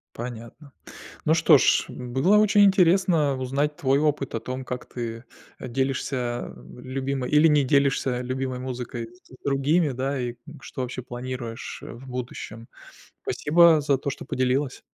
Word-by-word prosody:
Понятно. 120 +4 -8 0.5
Ну 160 - +4
что 165 -4 +6
ж, - - +3
было 130 +12 +1
очень 210 -1 +5
интересно 180 -6 +3
узнать 140 +3 -1
твой 135 0 +2
опыт 145 -4 0
о 115 - -1
том, 130 +2 -5
как 125 0 -5
ты 115 -1 -6 0.3
делишься, 130 +2 -2 0.3
а, - - -11 0.2
любимой 130 0 -3
или 150 +2 +6
не 145 -2 +4
делишься 135 -2 +2
любимой 130 0 -3
музыкой 125 -2 -5 0.2
с - - -21
другими, 145 +3 +2
да, 135 +1 -2
и 120 -1 -3
к 120 - -15
что 130 - -6
вообще 125 0 -5
планируешь, 120 -2 -6
а, - - -8
в 130 +3 -12
будущем. 120 -2 -7 0.5
Спасибо 165 0 +4
за 140 -1 +2
то, 140 +2 -4
что - - -7
поделилась. 130 +1 -1
130 Hz, 150 wpm, -25 LUFS, 125-145 Hz, 0.5 s, что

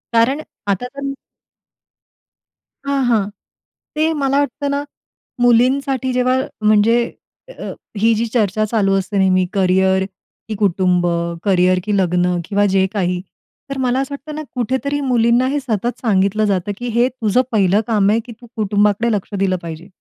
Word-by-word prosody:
हो. - - +6
कारण 265 +6 +2 0.3
आता 200 +4 0
तर 275 +2 -5 1.7
हां, 280 -1 +1
हां. 210 -4 +2 0.7
ते 310 +1 +2
मला 275 +1 +2
वाटतं 285 +1 -2
ना 280 - 0 0.6
मुलींसाठी 260 +2 +2
जेव्हा 250 0 +2 0.3
म्हणजे 215 +2 +4 0.5
अ, - - -8 0.3
ही 225 +3 +3
जी 225 +2 0
चर्चा 215 -2 +1
चालू 200 -4 +2
असते 200 +2 -4
नेहमी 185 -1 +3
करियर 190 0 +2 0.4
की 215 - -2
कुटुंब, 180 -3 +1 0.4
करिअर 185 -2 +3
की 210 0 0
लग्न 180 -1 +1
किंवा 205 +2 +1
जे 190 0 +4
काही. 180 -2 0 0.5
तर 275 - -4
मला 250 +1 +1
असं 275 +1 -5
वाटतं 295 +2 -9
ना 310 - -4
कुठेतरी 265 +4 -1
मुलींना 245 -1 +2
हे - - +1
सतत 240 -2 -2
सांगितलं 210 -1 +2
जातं 200 -1 0
की 245 +2 -5
हे 240 +1 +4
तुझं 240 -2 +1
पहिलं 205 -1 +3
काम 210 -3 +2
आहे 225 - +2
की 245 - -10
"तू 240 - -13
कुटुंबाकडे 210 +2 +1
लक्ष 205 0 -3
दिलं 190 -1 +1
पाहिजे." 165 +2 -8
215 Hz, 155 wpm, -18 LUFS, 195-255 Hz, 1.7 s, हो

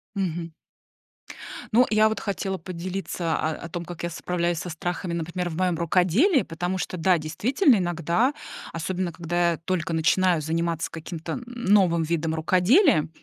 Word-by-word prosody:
Мгм. 170 -4 -2 1.2
Ну, 245 +3 +5
я 215 0 +5
вот 220 - -2
хотела 195 -1 -3
поделиться 180 -1 -3
о 155 - -1
о 170 - -7
том, 170 0 -5
как 175 -1 -8
я 170 - -1
справляюсь 175 0 -1
со 180 - -5
страхами, 175 +2 -3
например, 175 +2 -3
в 160 - -6
моём 180 -2 +1
рукоделии, 185 - +3
потому 175 +3 -3
что, 185 - -3
да, 175 +1 +3
действительно, 230 - +2
иногда, 175 - +1 0.4
особенно 175 +1 -2
когда 170 +1 0
я - - -3
только 165 -1 -2
начинаю 170 +2 +3
заниматься 165 +1 -1
каким-то 165 0 -6
н 245 - -5
новым 195 -8 +2
видом 160 0 -1
рукоделия, 180 - +4
175 Hz, 155 wpm, -25 LUFS, 165-190 Hz, 1.2 s, Ну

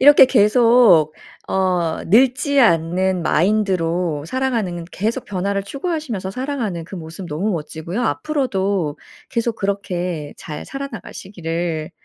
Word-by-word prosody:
이렇게 285 -1 +8
계속 220 - +5 0.3
어 180 -4 0
늙지 255 - +3
않는 180 -2 +2
마인드로 175 -5 +1
살아가는 220 -8 -1
계속 225 +6 -2
변화를 200 0 -2
추구하시면서 275 - -4
살아가는 235 - -3
그 190 - -10
모습 170 +2 -8
너무 170 +7 -2
멋지고요. 165 +6 -4
앞으로도 200 - -1 0.3
계속 230 -1 -1
그렇게 180 -6 -3
잘 150 -2 -7
살아 275 0 -5
나가시기를 165 -4 -4
190 Hz, 295 characters per minute, -20 LUFS, 170-240 Hz, 0.3 s, 이렇게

